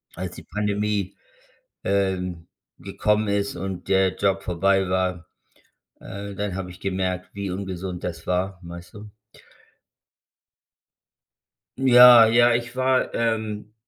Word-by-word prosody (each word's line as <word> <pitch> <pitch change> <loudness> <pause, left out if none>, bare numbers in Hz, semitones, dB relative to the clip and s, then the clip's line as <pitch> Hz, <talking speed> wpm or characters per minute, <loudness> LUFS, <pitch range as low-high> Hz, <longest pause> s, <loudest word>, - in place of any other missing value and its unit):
als 90 0 -6
die - - -11
Pandemie, 105 -2 -2 0.7
ähm, 90 -3 -1 0.3
gekommen 105 +3 0
ist 100 -1 -1
und 95 0 -6
der 95 -1 +2
Job 95 -1 0
vorbei 95 +2 +1
war, 90 -2 -1 0.7
äh, 100 0 -8
dann 100 -2 -3
habe 90 -2 -5
ich 90 - -14
gemerkt, 95 -1 -3
wie 100 -2 -4
ungesund 95 -1 -5
das 85 -2 -6
war, 90 +1 -1
weißt 85 +4 -11
du? 105 0 -11 2.7
Ja, 125 -3 +8
ja, 120 +1 +4
ich 120 +1 -3
war 130 0 +1
ähm, 110 -2 -2
95 Hz, 115 wpm, -23 LUFS, 90-105 Hz, 2.7 s, Ja